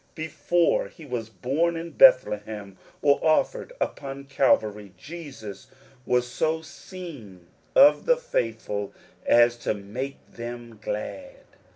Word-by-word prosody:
Before 165 +2 +1
he 165 - -14
was 120 -5 -4
born 135 - 0
in 165 +1 -5
Bethlehem, 105 - +4 0.3
or 140 -1 +5
offered 470 - +1
upon 140 0 -4
Calvary, 110 -7 +1
Jesus 135 - -9 0.4
was 125 0 +2
so 160 +5 -1
seen 145 - -10 0.3
of 280 +2 +6
the - - +5
faithful 110 - -3 0.3
as 120 0 +6
to 115 - -1
make 115 +8 -5
them 120 -1 -8
glad. 270 - -5
130 Hz, 110 wpm, -26 LUFS, 110-165 Hz, 0.4 s, of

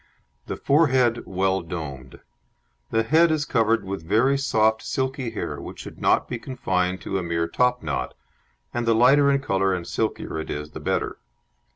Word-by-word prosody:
The - - -4
forehead 130 -5 +3
well 95 0 0
domed. 70 -7 -7 0.7
The 115 - +1
head 160 +8 +4
is 155 -1 0
covered 115 -3 +2
with 95 -2 -4
very 110 +10 +3
soft 110 -5 +2
silky 130 -2 -2
hair, 115 - -5
which - - -9
should - - -11
not - - +3
be 120 - -4
confined 95 -8 -1
to 95 - -2
a - - -4
mere 85 -1 -1
topknot, 125 +3 0 0.6
and 120 -1 -2
the 115 - +4
lighter 140 +5 +5
in 140 0 +1
colour 95 -7 +1
and 85 -2 -5
silkier 80 - -2
it 80 - -6
is 75 +1 -5
the - - -8
better. - - -2
115 Hz, 170 wpm, -24 LUFS, 90-130 Hz, 0.7 s, lighter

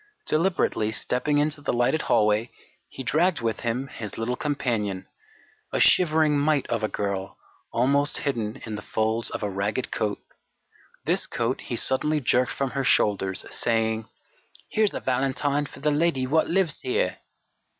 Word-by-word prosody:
Deliberately 155 - +1
stepping 125 +6 +1
into 150 0 0
the - - -1
lighted 120 +6 +1
hallway, 105 +2 +2 0.4
he 130 - -7
dragged 170 +7 +2
with 115 -2 -1
him 120 +3 -2
his 110 -6 -7
little 115 +2 -1
companion, 115 -10 -2 0.7
a - - -1
shivering 155 -4 +4
mite 145 -1 +2
of 115 -1 0
a 110 - +1
girl, 100 -2 -3 0.3
almost 140 +4 +2
hidden 115 -7 -2
in 110 - -6
the 105 - -4
folds 110 +1 0
of - - -5
a 105 - 0
ragged 100 +5 -2
coat. 105 -1 -1 0.9
This - - +1
coat 120 +2 -2
he 120 - -4
suddenly 150 +6 +2
jerked 125 -1 +2
from 135 -2 -2
her 135 0 -1
shoulders, 95 -6 +2
saying: 110 -1 0 0.6
"Here's 215 -2 +2
a - - -2
valentine 135 +3 0
for - - -13
the 150 +1 +2
lady 145 -3 +1
wot 155 +5 +2
lives 175 -4 +1
here!" 430 +6 -1
130 Hz, 155 wpm, -25 LUFS, 110-150 Hz, 0.9 s, shivering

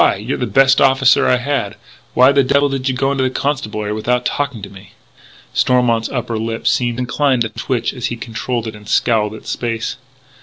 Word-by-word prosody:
You're 110 +7 -4
the 125 - -1
best 135 +5 +4
officer 135 -1 +4
I 125 - +4
had. 125 -6 -2 0.4
Why 130 +2 +6
the 140 0 +4
devil 140 +2 +2
did 135 -1 -2
you 130 - -1
go 135 +2 0
into 135 -1 0
the 130 - +1
Constabulary 110 -7 -2
without 125 +3 -1
talking 140 -7 -2
to 100 - -7
me?" 95 -1 -14 0.6
Stormont's 120 -3 +2
upper 120 -3 -3
lip 115 0 -4
seemed 120 0 +1
inclined 125 0 +1
to 115 - -3
twitch 125 0 -2
but 125 - -5
he 120 - -2
controlled 115 0 -4
it 110 - -5
and 105 0 -13
scowled 110 -3 +1
at - - -13
space. 115 0 -3
125 Hz, 195 wpm, -17 LUFS, 115-135 Hz, 0.6 s, Why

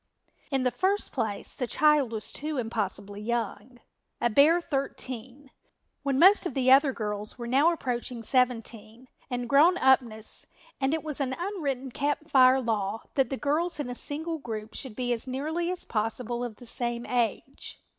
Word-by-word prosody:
In 270 -2 0
the 250 - +2
first 395 +7 0
place 220 -6 -3
the 250 - -4
child 300 -2 +3
was 220 -2 -4
too 300 0 -4
impossibly 205 -3 -3
young, 235 +1 -3 0.4
a 240 -1 +1
bare 300 +9 +6
thirteen, 270 -3 -5 0.5
when 275 -2 0
most 375 +4 +6
of 280 - -7
the 260 -1 +3
other 275 +1 +6
girls 210 -2 -4
were 240 - -6
now 275 +8 +4
approaching 245 -6 -3
seventeen 240 -1 -1 0.2
and 245 -1 -3
grown 310 +8 +5
up 265 -3 +5
ness, 220 -3 -5 0.3
and 270 +3 +1
it 320 - -4
was 300 -2 -3
an 260 -1 -1
unwritten 290 -9 -3
Camp 290 +4 -2
Fire 260 -1 +6
law 220 -2 -2
that 270 -2 +2
the 270 - -3
girls 310 +4 0
in 260 -4 -3
a - - -3
single 315 +6 -4
group 220 -4 -6
should 260 -6 -5
be 245 0 0
as 235 +2 -5
nearly 310 +7 -2
as 365 0 -4
possible 235 +2 -2
of 240 -3 -5
the 245 - -14
same 240 0 -2
age. 245 +2 -2
255 Hz, 175 wpm, -28 LUFS, 230-290 Hz, 0.5 s, bare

